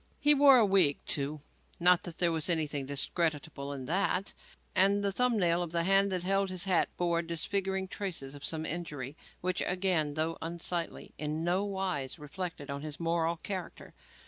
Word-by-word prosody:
He 295 +1 +5
wore 280 -2 +7
a 230 - +5
wig, 190 -8 +4
too 145 +1 -1 0.4
not 180 0 +5
that 175 -3 -7
there 175 -1 +3
was 160 +1 0
anything 150 -5 0
discreditable 145 0 -1
in 135 -2 -6
that 190 +4 0 0.4
and 200 +2 +3
the 200 - +1
thumb 250 +2 +1
nail 175 -3 +2
of 175 -2 -4
the 170 0 0
hand 195 +2 +3
that 180 -2 -1
held 195 +1 +1
his 185 -1 -1
hat 185 -3 +2
bore 170 -1 +1
disfiguring 190 +3 -1
traces 175 -9 -5
of 145 0 -10
some 160 0 -2
injury 150 -5 -4 0.3
which, 180 0 0
again, 180 -5 +1
though 160 +1 -1
unsightly, 170 +1 -3
in 155 +1 -2
no 180 +3 +1
wise 190 -9 -2
reflected 150 -1 -6
on 140 0 -4
his 150 -1 -6
moral 165 0 0
character. 185 +1 -6
170 Hz, 175 wpm, -31 LUFS, 155-190 Hz, 0.4 s, wore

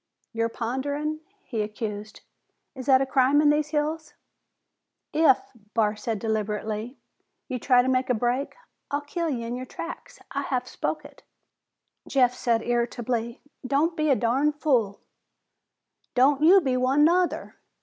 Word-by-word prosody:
"You're 230 0 0
ponderin'," 285 +7 -3 0.3
he 225 -3 -2
accused. 210 0 -5 0.5
"Is 260 -1 -8
that 265 -1 +6
a - - -2
crime 265 +1 +3
in 295 -1 +5
these 300 0 +1
hills?" 305 +1 -2 1.0
"If," 305 -5 +5 0.4
Barr 215 -2 +2
said 215 +1 -3
deliberately, 215 +2 -3 0.5
"you 255 -3 -3
try 250 +1 +4
to - - -2
make 260 0 +1
a 250 - +3
break, 245 +5 -1 0.3
I'll 285 +1 -1
kill 330 +3 -3
ye 245 -5 -2
in 235 +1 -4
your 255 +1 -6
tracks. 335 - -8
I 280 - -2
have 255 -2 -2
spoke - - -3
it." - - -14 0.9
Jeff 250 -3 +3
said 235 -2 0
irritably, 235 0 -2 0.2
"Don't 285 +6 +1
be 310 -2 0
a 275 - +5
darn 260 +6 +1
fool!" 245 -9 0 1.1
"Don't 270 +3 +4
you 370 +5 +7
be 265 -5 0
one, 260 +3 +3
nuther. 355 +2 +1
255 Hz, 150 wpm, -26 LUFS, 235-295 Hz, 1.1 s, you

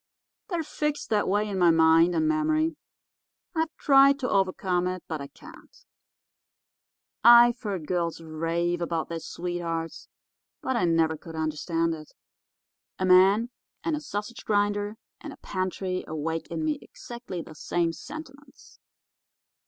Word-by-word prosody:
They're 345 -4 -1
fixed 300 -3 -3
that 210 -1 +2
way 205 +2 +1
in 195 -2 -3
my 175 -1 +5
mind 165 +1 +5
and 315 - +2
memory. 315 +1 +1 0.8
I've 320 -1 0
tried 275 0 +6
to 250 - -1
overcome 185 -2 +1
it, 185 0 -4
but 160 -3 -4
I 140 - -6
can't. 320 - -16 1.5
I've 240 +1 +7
heard 195 -7 -4
girls 170 -1 -1
rave 165 +2 -2
about 165 -2 -2
their 165 -1 -4
sweethearts, 170 -1 -4 0.5
but 260 - -2
I 230 - +2
never 165 -1 +2
could 165 +1 -11
understand 165 +1 -1
it. 155 -1 -10 0.8
A 185 - -1
man 195 +6 +5 0.3
and 320 0 0
a 300 - -5
sausage 210 -4 -6
grinder 205 0 0 0.2
and 300 -3 -8
a - - -15
pantry 185 0 -3
awake 160 +1 -3
in 160 -2 -3
me 155 -1 -1
exactly 235 -8 -8
the 160 - -12
same 165 +2 -1
sentiments. 280 - -12
185 Hz, 140 wpm, -27 LUFS, 165-240 Hz, 1.5 s, I've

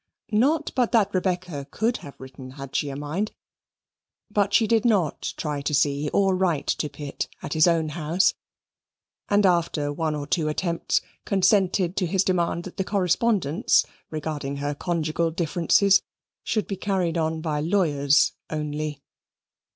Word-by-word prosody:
Not 275 +9 +2
but 250 -3 +2
that 220 -4 +3
Rebecca 180 -6 -2
could 230 +3 0
have 140 - -12
written 130 0 -10
had 135 -1 -8
she 145 - 0
a 135 - -5
mind, 150 +9 -3 1.0
but 205 -1 +1
she 225 - +4
did 225 0 +2
not 200 -10 0
try 150 -2 -3
to 145 +1 0
see 145 +1 +1
or 195 +3 +2
to 185 - +1
write 175 -6 +1
to 150 - -1
Pitt 145 0 -5 0.2
at - - -4
his 155 +1 +5
own 165 -2 +2
house, 165 +4 +1 1.0
and 205 0 +4
after 165 -5 +1
one 155 0 -1
or 145 -1 -4
two 155 +1 0
attempts 170 +2 0 0.2
consented 190 -2 +2
to 185 - +1
his 190 +2 +2
demand 175 -2 0
that 185 - -10
the 190 - 0
correspondence 190 - +2 0.2
regarding 150 -3 -4
her 145 +1 -2
conjugal 165 +1 -1
differences 175 +4 +3 0.4
should 215 - -1
be 195 - -4
carried 185 -4 -1
on 160 -1 0
by 155 -2 -2
lawyers 150 -4 +2 0.2
only. 150 -1 -4
170 Hz, 155 wpm, -25 LUFS, 150-190 Hz, 1.0 s, his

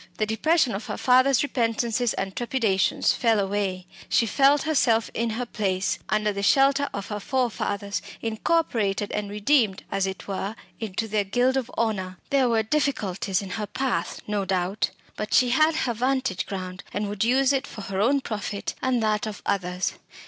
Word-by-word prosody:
The 215 - +1
depression 255 +5 +2
of 200 +3 -5
her - - -4
father's 255 +2 +4
repentances 235 -2 0
and 195 -1 -3
trepidations 230 -6 +1
fell 225 -3 +2
away; 195 -2 -1 0.2
she 230 - +3
felt 275 +5 +4
herself 250 -8 +2
in 235 0 -1
her 235 +3 -2
place, 195 -5 -1
under 215 -1 +1
the 200 - -3
shelter 275 +6 +4
of 200 -1 -5
her 210 -1 -3
forefathers, 205 -5 -1 0.2
incorporated 220 -4 0
and 210 -1 -3
redeemed, 210 -1 +2
as 195 -1 0
it 190 - -6
were, 200 +2 -3 0.2
into 220 0 -3
their 210 -1 +1
guild 245 +6 +1
of 255 -3 -1
honour. 190 -5 -1
There 270 -3 +3
were 225 -1 +2
difficulties 210 -8 0
in 190 - -7
her 210 - -3
path, 260 +5 -2
no 210 -1 -1
doubt 190 +1 0 0.3
but 215 0 -1
she 250 - +5
had 310 +5 +4
her 250 -6 0
vantage 255 -5 -1
ground, 185 -1 -6
and 205 0 -2
would 205 0 -1
use 260 +3 +3
it 270 - -1
for 215 - -8
her 195 0 -2
own 275 +6 +3
profit 210 -3 -4
and 255 -3 +1
that 215 0 +1
of 210 - -7
others. 180 -1 -1
220 Hz, 175 wpm, -25 LUFS, 200-255 Hz, 0.3 s, she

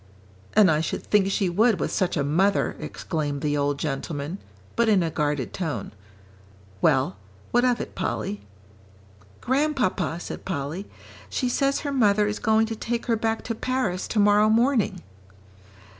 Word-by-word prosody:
"And 200 -5 +6
I 155 0 +2
should 160 - -3
think 200 -2 +2
she 195 -1 +1
would 215 +4 +3
with - - -1
such 180 -2 0
a 145 - +1
mother," 185 +8 +2
exclaimed 145 -4 -3
the 145 -1 0
old 145 0 0
gentleman, 145 +4 -4 0.4
but 235 -1 +3
in 195 -4 +4
a 165 - -2
guarded 145 -4 -1
tone. 150 - -3 0.9
"Well, 130 -7 +2 0.3
what 245 +1 +3
of 250 -1 +2
it, - - -6
Polly?" 195 +2 -3 1.0
"Grandpapa," 250 - 0
said - - -7
Polly, 160 +3 -4 0.4
"she 255 - -1
says 275 +2 +1
her 285 - -3
mother 210 -5 +3
is 210 0 -2
going 220 0 +3
to 225 0 -4
take 235 +2 -3
her 235 - +2
back 225 0 -1
to 230 - -3
Paris 225 -6 -1
tomorrow 210 0 +4
morning." 235 +1 +2
200 Hz, 155 wpm, -25 LUFS, 155-225 Hz, 1.0 s, And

